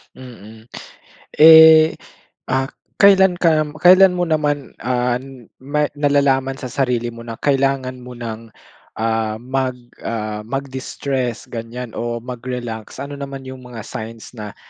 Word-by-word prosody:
Mm. 110 -3 -13 0.7
Eh, 160 0 +8 0.5
ah, 130 +1 0 0.3
kailan 190 -2 +5
ka 160 -3 +3
kailan 185 +2 +6
mo 180 - +1
naman, 150 -3 -1
ah, 125 0 0 0.4
may 145 +2 -1
nalalaman 140 -2 +1
sa 130 -2 -7
sarili 120 -3 -1
mo 115 - -11
na 115 -1 -8
kailangan 135 -2 0
mo 125 0 -10
ng, 115 -1 -7 0.5
ah, 110 -1 -1
mag, 130 +2 -2 0.2
ah, 110 -2 -4
mag-distress 130 0 -4
ganyan 115 +1 -6
o 120 0 -3
mag-relax? 120 -2 -6
Ano 140 +1 -7
naman 135 -1 -7
yung 130 0 -9
mga 115 -3 -9
signs 110 0 -8
na 105 -4 -9
130 Hz, 125 wpm, -19 LUFS, 115-140 Hz, 0.7 s, Eh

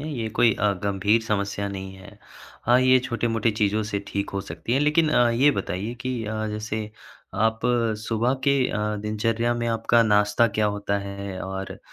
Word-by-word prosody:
है। 155 - -5
ये 110 -2 -2
कोई 115 -2 +5
अ, 105 -1 +1
गंभीर 100 +3 +2
समस्या 100 -2 -2
नहीं 95 -1 -7
है। 100 +2 -14 0.5
हाँ, 125 +1 +5
ये 130 0 +5
छोटी-मोटी 115 -2 0
चीज़ों 105 0 +1
से 100 - -1
ठीक 100 0 -3
हो 100 - -3
सकती 90 +5 -5
है। 135 - +3
लेक़िन 150 +2 +3
अ, 120 -5 +4
ये 130 +5 +4
बताइए 100 0 -3
कि 125 -3 -3
अ, 110 +1 -3
जैसे 105 0 -4 0.4
आप 110 +2 +1 0.5
सुबह 120 +3 +1
के 140 0 +4
अ, 105 0 -2
दिनचर्या 115 +2 0
में 120 0 -2
आपका 115 +1 +3
नाश्ता 105 +1 +3
क्या 105 - +3
होता 100 0 -1
है 100 -1 -6
और 95 0 -6
110 Hz, 180 wpm, -24 LUFS, 100-120 Hz, 0.5 s, कोई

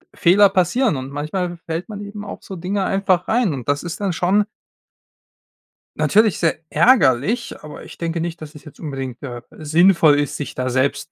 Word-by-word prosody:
Fehler 195 +4 +5
passieren 195 - +1
und 130 0 -6
manchmal 175 +5 -3
fällt 165 +3 -4
man 205 -1 -7
eben 205 0 -8
auf 200 - -9
so 190 - -8
Dinge 190 +3 -2
einfach 190 -2 +1
rein. 225 -7 +1
Und 125 -4 -7
das 145 0 0
ist 170 -2 -6
dann 195 -3 0
schon 190 +5 +2 1.5
natürlich 215 -1 +3
sehr 165 -2 +1
ärgerlich, 220 - +3
aber 150 - -10
ich - - -12
denke 165 0 -3
nicht, 170 0 -5
dass 155 0 -10
es 150 - -12
jetzt 150 - -14
unbedingt, 135 -5 -6
äh, 120 -3 -6 0.2
sinnvoll 160 -1 +4
ist, 145 - -2
sich 145 - -6
da 130 0 -2
selbst 130 +2 -1
170 Hz, 185 wpm, -20 LUFS, 145-195 Hz, 1.5 s, Fehler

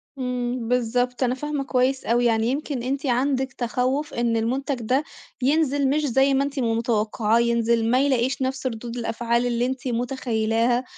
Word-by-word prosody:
إمم، 250 -2 -3
بالضبط 250 +1 0
أنا 250 0 +1
فاهمة 295 0 -3
كويس 260 0 0
أوي. 240 +1 +2
يعني 225 -1 +2
يمكن 275 -1 -2
أنتِ 270 +3 -2
عندِك 265 +1 0
تخوُّف 255 +4 -1
إن 235 -1 0
المنتج 265 +5 -1
ده 260 +6 +1 0.4
ينزل 280 0 +2
مش 300 +2 +1
زي 270 +1 +3
ما 270 +1 +2
أنتِ 280 -1 -3
ما 230 -2 +1
متوقعاه، 225 -1 +1
ينزل 235 -1 +2
ما 255 - +4
يلاقيش 260 -1 +1
نفس 260 0 -2
رُدود 235 0 -5
الأفعال 235 +1 0
اللي 240 0 0
أنتِ 260 0 -3
متخيلاها، 240 -1 0
250 Hz, 165 wpm, -24 LUFS, 235-265 Hz, 0.4 s, ما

